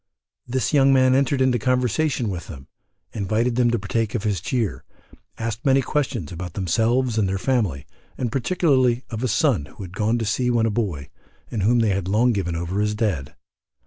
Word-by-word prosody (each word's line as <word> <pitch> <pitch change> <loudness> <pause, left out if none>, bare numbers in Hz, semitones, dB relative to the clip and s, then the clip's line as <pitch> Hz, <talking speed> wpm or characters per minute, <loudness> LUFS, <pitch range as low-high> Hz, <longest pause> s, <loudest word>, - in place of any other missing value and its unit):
The 125 -2 0
young 135 -2 +5
man 130 -1 +4
entered 135 0 +2
into 130 -2 +3
conversation 125 +1 0
with 90 -3 -5
them, 70 -4 -10 0.5
invited 110 +4 0
them 120 -1 +3
to 120 - +1
partake 105 +2 -2
of 110 - -2
his 100 -6 -1
cheer, 115 -1 -2 0.5
asked 115 -1 -4
many 135 -1 +3
questions 125 - -2
about 90 0 -6
themselves 115 +6 +1
and 100 -3 +1
their 95 - -1
family, 100 - -1 0.3
and 120 -3 -2
particularly 130 -3 +2
of 110 -1 -4
a - - +2
son 75 -9 +1
who 75 +7 -11
had 95 0 -10
gone 110 +3 +1
to 115 - -2
sea 125 +4 0
when 120 -2 +2
a 115 - +1
boy, 95 - -3 0.4
and 110 - -2
whom 115 +5 +3
they 110 - +2
had 95 -2 -1
long 115 +6 +3
given 90 -5 -2
over 85 +4 -2
as 105 0 0
dead. 95 - -2
115 Hz, 195 wpm, -23 LUFS, 95-125 Hz, 0.5 s, young